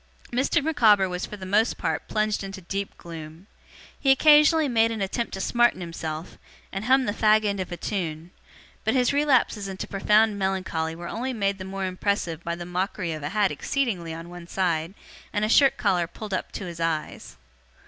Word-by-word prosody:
Mr. 255 +3 +1
Micawber 220 -11 +4
was 180 0 -4
for 210 - -8
the 190 - -8
most 210 +5 +2
part - - -2
plunged 215 -1 0
into 195 0 -7
deep 195 +2 -5
gloom. 165 +1 -10 0.5
He 275 - +1
occasionally 300 +3 +6
made 230 -3 +3
an 225 -1 -4
attempt 205 +4 -2
to 195 - -4
smarten 240 -2 +2
himself, 165 -2 -6 0.3
and 195 +2 -4
hum 260 +1 +4
the 205 - -1
fag 215 0 +4
end 200 -1 0
of 185 - -4
a 175 - -4
tune; 170 -4 -4 0.5
but 220 +4 +1
his 250 +1 +3
relapses 260 -8 +2
into 190 -1 -5
profound 210 +1 +3
melancholy 185 -4 -1
were 170 +1 -7
only 255 +6 -3
made 200 -3 -1
the 185 - -6
more 195 0 -4
impressive 185 -3 -2
by 170 0 -2
the 175 0 -7
mockery 180 0 -2
of 155 -1 -5
a 145 - -3
hat 210 -2 +2
exceedingly 215 - -2
on 165 +1 -7
one 175 -1 -10
side, 170 -1 -1 0.4
and 210 0 0
a - - -2
shirt 275 +3 +5
collar 175 -3 +1
pulled 205 +4 -8
up - - -3
to 200 - -5
his 170 -2 -7
eyes. 160 - -3
195 Hz, 195 wpm, -25 LUFS, 175-220 Hz, 0.5 s, occasionally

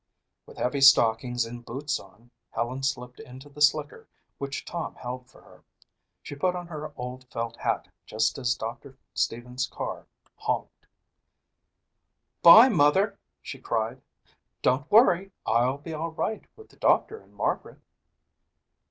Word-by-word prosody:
With - - -14
heavy 135 +2 -1
stockings 120 -2 +5
and 120 +1 -9
boots 140 +5 -3
on, 105 +5 -18 0.2
Helen 120 +4 -3
slipped 125 -2 -3
into 130 +3 -12
the 145 +1 -12
slicker 150 0 +2 0.3
which 140 0 -5
Tom 170 - -5
held 125 0 -7
for - - -19
her. - - -19 0.6
She - - -8
put 180 +6 0
on 175 0 -5
her 155 -2 -7
old 125 +1 -7
felt 115 0 -4
hat - - -2 0.2
just 110 +3 0
as 120 -2 +1
Doctor 130 +4 -7 0.2
Stevens' 125 +2 -2
car - - -6 0.3
honked. - - -4 1.5
"Bye, 220 +9 +10
Mother," 195 - +3 0.2
she 135 - -8
cried. 115 +2 -2 0.6
"Don't 135 +4 +1
worry. 195 -4 +5
I'll 125 +3 +2
be 155 +3 -8
all 160 +2 -3
right 210 +6 -3
with 440 - -16
the - - -22
doctor 445 - +2
and - - -23
Margaret." - - -2
135 Hz, 140 wpm, -27 LUFS, 120-155 Hz, 1.5 s, Bye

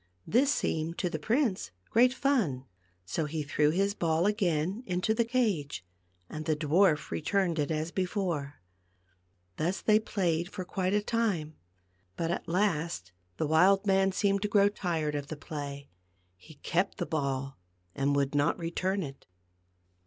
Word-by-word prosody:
This 270 +5 +3
seemed 160 - -1
to 180 - -1
the 160 - -3
prince 225 - 0 0.2
great 245 +2 +5
fun, 235 - 0 0.4
so 155 - -2
he 155 +1 -3
threw 150 +1 +2
his 195 +5 +1
ball 165 -2 +1
again 190 -1 0
into 180 +4 +1
the 235 +1 +2
cage, 210 - -1 0.4
and 155 +7 -6
the 155 - +2
dwarf 155 +1 +2
returned 175 0 0
it 145 - 0
as 160 +1 -2
before. 180 -7 -2 1.0
Thus 175 +5 0
they 215 -1 +4
played 175 -5 -1
for 185 - -5
quite 185 +2 -1
a 210 - +1
time. 200 -10 -1 0.6
But 165 0 -1
at - - -3
last 170 - 0 0.3
the - - 0
wild 185 +6 +4
man 195 -1 +3
seemed 200 0 +1
to 210 - 0
grow 205 -1 +4
tired 165 -7 -2
of 145 -1 -3
the 155 - -6
play; 145 -2 -7 0.4
he 90 - -16
kept 180 +6 -1
the 175 - -2
ball 135 - -2 0.3
and 140 +1 +1
would 140 0 +1
not 145 0 +2
return 185 +3 -1
it. 135 -2 -9
170 Hz, 155 wpm, -30 LUFS, 150-200 Hz, 1.0 s, great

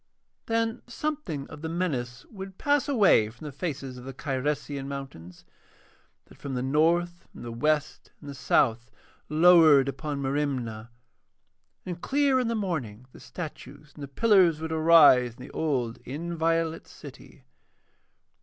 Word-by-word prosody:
Then 225 0 -1
something 240 - -4
of 145 - -10
the 160 - -4
menace 130 -9 -3
would 195 -3 -10
pass 290 0 +1
away 200 - +4
from 120 +7 -13
the 150 - -6
faces 135 -3 -5
of - - -12
the 135 0 -9
Cyresian 140 0 -3
mountains, 135 -12 -9 0.8
that - - -19
from 140 -2 -5
the 125 - -2
north 170 +5 +1
and - - -10
the 120 - -6
west 150 +5 -1
and 145 - -13
the 140 - -6
south 120 -2 +1 0.4
lowered 155 -4 +6
upon 140 +1 -4
Merimna, 135 -6 -3 1.0
and 175 -2 -6
clear 275 -1 +2
in 250 - -1
the 230 - -1
morning 140 - -4
the - - -15
statues 150 -3 -9
and 150 - -13
the 140 - -6
pillars 185 0 +3
would 160 0 -5
arise 155 -7 +5
in - - -12
the - - -11
old 125 -6 -2
inviolate 165 +2 -2
city. - - -14
150 Hz, 145 wpm, -27 LUFS, 130-175 Hz, 1.0 s, lowered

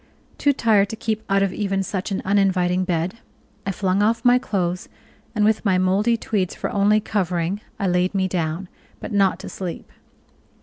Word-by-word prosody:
Too 285 - +4
tired 215 -6 +3
to - - -4
keep 220 -1 -2
out 195 0 +3
of 195 -2 0
even 195 -2 -1
such 190 +1 -3
an 195 - -2
uninviting 185 -2 +2
bed, 180 +4 -2 0.5
I - - +1
flung 190 +1 0
off 230 +3 +1
my 245 0 +6
clothes, 180 -6 -2 0.5
and 210 -1 +3
with 215 0 +2
my 195 -4 +3
moldy 200 +6 +2
tweeds 200 -5 -1
for - - -4
only 205 +1 +3
covering 185 -2 -1 0.2
I 200 - -2
laid 180 +1 +1
me 190 -1 +2
down, 170 0 -2 0.3
but - - -7
not 200 -2 +3
to - - -8
sleep. 180 -3 -6
195 Hz, 180 wpm, -22 LUFS, 185-210 Hz, 0.5 s, my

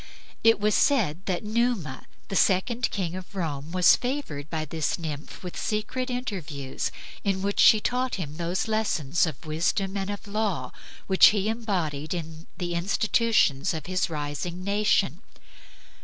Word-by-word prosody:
It 225 -1 +6
was 210 +1 +2
said 190 - +2
that 185 0 -1
Numa, 215 - -1 0.2
the 195 - -3
second 230 +7 +2
king 180 -4 -3
of 185 +1 -9
Rome, 155 -4 -3
was 180 0 +6
favored 245 - -4
by 160 -1 -2
this 155 0 -1
nymph 155 -2 -6
with 180 - -6
secret 230 +4 -2
interviews, 175 - -3 0.3
in 195 -2 0
which 200 0 -1
she 215 - +8
taught 250 +3 -1
him 155 -5 -5
those 175 +4 -1
lessons 175 -8 +1
of 155 -2 -7
wisdom 175 +5 0
and 195 0 -2
of 205 +1 -5
law 200 -11 -2 0.3
which 190 -1 +7
he 205 -1 +2
imbodied 180 -9 -2
in 160 -1 -7
the 175 -1 -3
institutions 195 - +2
of 155 - -6
his 185 -1 0
rising 155 +4 -4
nation. 205 +2 +1
185 Hz, 150 wpm, -26 LUFS, 160-215 Hz, 0.3 s, she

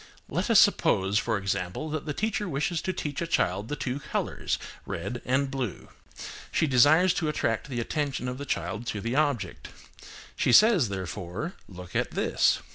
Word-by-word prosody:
Let - - -1
us - - +7
suppose, 95 +2 +3
for 115 0 0
example, 95 - -2
that 155 0 -4
the 150 - -1
teacher 210 -1 -1
wishes 150 +3 -1
to 185 - -1
teach 150 -5 -4
to 170 - -1
a - - -8
child 100 - 0
the 150 - -3
two 135 -1 -3
colours, - - -2 0.3
red 120 -1 -5
and 135 +2 +1
blue. 125 - -4 0.6
She - - +2
desires 155 +7 +5
to 170 -5 -1
attract 115 -3 -1
the 125 -3 -3
attention 135 +1 -2
of 125 +1 -4
the 145 - -5
child 115 -2 -3
to 105 - -2
the 115 +5 -2
object. 140 - 0 0.7
She 125 - +2
says, 205 - +6
therefore, 95 - -4 0.2
"Look 90 -2 -10
at - - +1
this." - - +2
130 Hz, 180 wpm, -27 LUFS, 105-155 Hz, 0.7 s, us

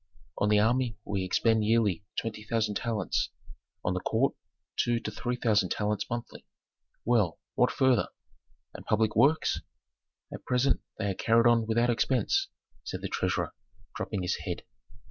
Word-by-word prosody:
"On 100 - +2
the 105 - +5
army 115 +1 +2
we 100 -2 -1
expend 110 +4 +2
yearly 105 -5 +2 0.2
twenty 110 -2 -5
thousand 110 -1 0
talents; 110 -3 -1 0.6
on 90 - +1
the 90 - -1
court 115 +8 +1 0.4
two 120 -1 +1
to 110 - -5
three 125 +4 -2
thousand 105 -6 +2
talents 105 -1 -1
monthly." 120 0 -6 0.6
"Well, 110 -9 +2
what - - +3
further? 130 -5 +3 0.7
And - - -9
public 110 0 +1
works?" 155 +3 +3 0.7
"At - - -8
present 125 +1 +2 0.2
they 100 -2 -1
are - - -1
carried 115 +4 +3
on 115 -2 +4
without 120 +2 +2
expense," 135 - +1 0.4
said - - -6
the - - -2
treasurer, - - -1 0.4
dropping 100 -4 -3
his 90 - 0
head. - - -5
110 Hz, 150 wpm, -29 LUFS, 105-120 Hz, 0.7 s, the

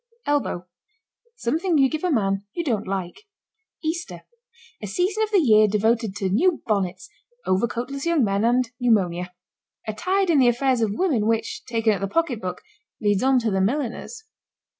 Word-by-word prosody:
ELBOW. 285 -11 -1 0.7
Something 335 - 0
you 270 -1 +5
give 310 +4 -4
a 365 - +1
man 195 - +1
you 340 - -2
don't 220 - -1
like. 195 - -5 0.6
EASTER. 330 +3 -4 0.6
A 210 - -5
season 370 - 0
of 435 - +1
the 420 - +3
year 215 - +5
devoted 220 0 +1
to 205 -2 -2
new 325 - +2
bonnets, 190 -4 -1 0.4
overcoatless 235 +7 -1
young 335 -5 +3
men 200 0 +1
and 245 +1 +2
pneumonia. 180 -7 +1 0.6
A 215 - -2
tide 375 - +1
in 300 - +4
the 255 - +5
affairs 245 +1 +2
of 220 - +2
women 275 - +1
which, 225 0 -1
taken 225 -3 +1
at 195 - -4
the 195 - -1
pocketbook, 225 - -2 0.4
leads 205 -2 +1
on 265 0 +3
to 225 -2 0
the 190 0 +1
milliners. 270 - -2
235 Hz, 165 wpm, -23 LUFS, 205-305 Hz, 0.7 s, you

